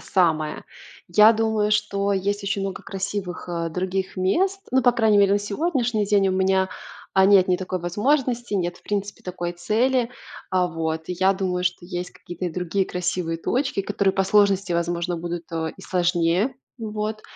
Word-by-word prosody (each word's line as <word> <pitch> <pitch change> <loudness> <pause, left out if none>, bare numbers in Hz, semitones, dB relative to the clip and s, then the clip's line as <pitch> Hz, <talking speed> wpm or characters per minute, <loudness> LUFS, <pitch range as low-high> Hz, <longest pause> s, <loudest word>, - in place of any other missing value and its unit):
самое. 160 -5 0 0.4
Я 210 +5 +7
думаю, 220 -1 +1
что 200 -1 +1
есть 200 +2 -1
очень 200 0 -1
много 195 -1 -4
красивых, 195 -2 -5
э, 170 -1 -2
других 185 +2 -2
мест, 375 - +1
ну, 260 -1 +4
по 245 - +6
крайней 220 -3 +3
мере 200 0 +5
на - - +3
сегодняшний 230 - -1
день, 200 -2 +3
у - - 0
меня, 190 0 +2 0.5
а, 190 0 +5
нет 195 -2 +6
ни 180 - +3
такой 185 0 -3
возможности, 240 - 0
нет, 175 -2 -1
в - - -25
принципе, 205 0 -3
такой 175 -1 -4
цели, 235 +7 +1 0.4
а, 185 -1 +2
вот. 160 -1 -3
И - - -1
я 190 +1 +4
думаю, 185 -2 -2
что 175 0 -2
есть 180 -1 -4
какие-то 175 +1 -7
и - - -3
другие 180 +3 -1
красивые 180 -2 -2
точки, 255 - -1
которые 195 -1 0
по 195 - +1
сложности, 200 -2 +3
возможно, 170 +1 -1
будут, 170 0 -5
э, 160 -1 -2
и - - -13
сложнее. 175 +6 +1 0.2
Вот. 215 -1 -4
190 Hz, 175 wpm, -23 LUFS, 175-210 Hz, 0.5 s, Я